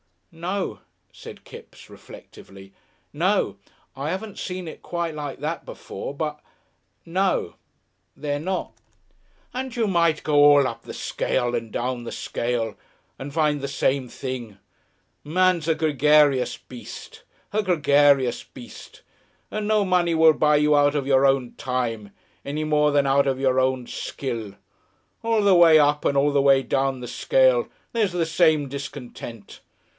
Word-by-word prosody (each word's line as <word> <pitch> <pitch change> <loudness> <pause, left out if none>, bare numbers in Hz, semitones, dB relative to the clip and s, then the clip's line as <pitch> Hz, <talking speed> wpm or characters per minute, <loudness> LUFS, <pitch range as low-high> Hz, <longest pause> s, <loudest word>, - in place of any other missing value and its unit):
"No," 185 +4 -4 0.3
said - - -12
Kipps, - - -13
reflectively. 95 0 -14 0.4
"No. - - 0 0.4
I 140 +4 -3
'aven't 200 +2 -6
seen 185 -1 -5
it 160 - -9
quite 170 -2 -3
like 145 -2 -6
that 160 +3 -3
before, - - -7
but. 150 0 -4 0.7
No. 185 +3 0 0.6
They're 145 0 -3
not." 185 +4 -3 0.8
"And 255 -1 -5
you 230 -3 +1
might 170 -4 +1
go 150 - 0
all 145 -2 +6
up 115 -1 -7
the - - -9
scale 120 -1 -2
and 115 -2 -3
down 120 +1 -3
the - - -6
scale 115 -3 -3 0.4
and 140 +1 -7
find 150 -2 +1
the 140 - -4
same 135 -1 0
thing. 120 -5 -6 0.7
Man's 180 0 +2
a 160 - +2
gregarious 150 -3 +3
beast, 125 -2 -11 0.3
a 215 - +1
gregarious 145 - +3
beast, - - -13 0.5
and 215 -1 -3
no 215 -1 +3
money 180 -3 +1
will 160 0 +6
buy 150 0 +3
you 150 0 +3
out 145 0 +3
of 140 -2 -1
your 135 0 +4
own 135 -3 0
time 115 -5 -3 0.3
any 150 +2 -3
more 150 -1 +2
than 145 -1 +3
out 140 +1 +3
of 135 -1 0
your 130 -1 +2
own 130 -1 0
skill. 115 -6 -5 0.7
All 225 -2 +1
the 200 -1 +5
way 170 -3 +7
up 150 0 +2
and 140 - +2
all 145 +1 +3
the 140 -1 +2
way 135 -1 +4
down 135 +1 -1
the 125 - -6
scale - - +2 0.2
there's 215 -6 0
the 175 -2 0
same 160 -3 +2
discontent. 125 -5 -8
145 Hz, 150 wpm, -23 LUFS, 130-170 Hz, 0.8 s, way